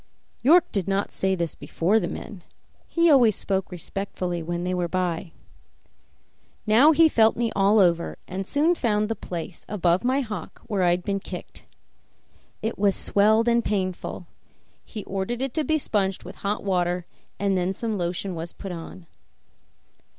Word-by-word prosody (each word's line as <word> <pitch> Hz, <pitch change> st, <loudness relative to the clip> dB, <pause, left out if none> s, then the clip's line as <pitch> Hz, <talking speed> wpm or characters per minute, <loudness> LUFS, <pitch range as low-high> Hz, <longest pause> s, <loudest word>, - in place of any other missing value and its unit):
York 325 Hz, +7 st, +5 dB
did 195 Hz, -4 st, -1 dB
not 195 Hz, +1 st, 0 dB
say 190 Hz, 0 st, 0 dB
this 170 Hz, -3 st, -2 dB
before 195 Hz, +7 st, +1 dB
the -, -, -2 dB
men; 195 Hz, -5 st, -8 dB, 0.4 s
he 335 Hz, 0 st, +2 dB
always 245 Hz, -, +6 dB
spoke 190 Hz, -1 st, -2 dB
respectfully 180 Hz, -1 st, -4 dB
when 175 Hz, +1 st, -3 dB
they 180 Hz, 0 st, -1 dB
were 180 Hz, -1 st, 0 dB
by. 175 Hz, -1 st, -2 dB, 1.3 s
Now 235 Hz, +8 st, +6 dB
he 325 Hz, +1 st, +6 dB
felt 225 Hz, -7 st, +3 dB
me 230 Hz, -1 st, 0 dB
all 200 Hz, +2 st, +4 dB
over, 170 Hz, -4 st, +2 dB
and 190 Hz, +1 st, -5 dB
soon 310 Hz, +5 st, +3 dB
found 215 Hz, -8 st, 0 dB
the 225 Hz, -, -1 dB
place 175 Hz, -2 st, -7 dB
above 180 Hz, -2 st, +1 dB
my 260 Hz, +3 st, +2 dB
hock 210 Hz, -, -7 dB
where 200 Hz, -3 st, -1 dB
I 180 Hz, -, +4 dB
had 175 Hz, +1 st, +1 dB
been 195 Hz, +1 st, -1 dB
kicked. 185 Hz, -1 st, -9 dB, 1.0 s
It 220 Hz, -1 st, -2 dB
was 200 Hz, -1 st, +3 dB
swelled 220 Hz, +3 st, +3 dB
and 235 Hz, 0 st, +3 dB
painful; 185 Hz, -3 st, -3 dB, 0.6 s
he 215 Hz, -3 st, -7 dB
ordered 195 Hz, +6 st, -3 dB
it 270 Hz, -2 st, -3 dB
to 315 Hz, -, 0 dB
be 315 Hz, +1 st, +1 dB
sponged 195 Hz, -9 st, -1 dB
with 180 Hz, -, -10 dB
hot 205 Hz, +1 st, -2 dB
water, 180 Hz, -2 st, 0 dB, 0.3 s
and 200 Hz, 0 st, +1 dB
then 180 Hz, 0 st, 0 dB
some 225 Hz, 0 st, -2 dB
lotion 180 Hz, +1 st, -2 dB
was 165 Hz, 0 st, -6 dB
put 195 Hz, -, -7 dB
on. 170 Hz, +1 st, -8 dB
195 Hz, 165 wpm, -25 LUFS, 180-225 Hz, 1.3 s, always